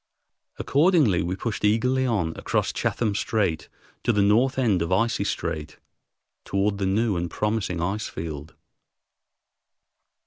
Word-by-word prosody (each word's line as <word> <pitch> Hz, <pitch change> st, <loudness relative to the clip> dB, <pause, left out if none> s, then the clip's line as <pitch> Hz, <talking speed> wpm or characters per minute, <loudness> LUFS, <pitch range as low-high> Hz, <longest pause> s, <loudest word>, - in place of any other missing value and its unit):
Accordingly, 150 Hz, -, +3 dB
we 90 Hz, +2 st, -2 dB
pushed 105 Hz, +2 st, -4 dB
eagerly 125 Hz, +5 st, +2 dB
on 90 Hz, -9 st, 0 dB
across -, -, -1 dB
Chatham 110 Hz, -4 st, -1 dB
Strait 100 Hz, -6 st, -1 dB, 0.3 s
to 120 Hz, -, +2 dB
the 105 Hz, -3 st, +2 dB
north 120 Hz, +7 st, +3 dB
end 110 Hz, -9 st, +2 dB
of 85 Hz, +1 st, -2 dB
Icy 110 Hz, +2 st, +1 dB
Strait, 80 Hz, -4 st, -3 dB, 0.7 s
toward 100 Hz, +1 st, 0 dB
the 95 Hz, -, 0 dB
new 105 Hz, +2 st, +1 dB
and 85 Hz, 0 st, -2 dB
promising 105 Hz, -3 st, -1 dB
ice 100 Hz, +4 st, -2 dB
field. 75 Hz, -1 st, -7 dB
100 Hz, 130 wpm, -25 LUFS, 85-115 Hz, 0.7 s, Accordingly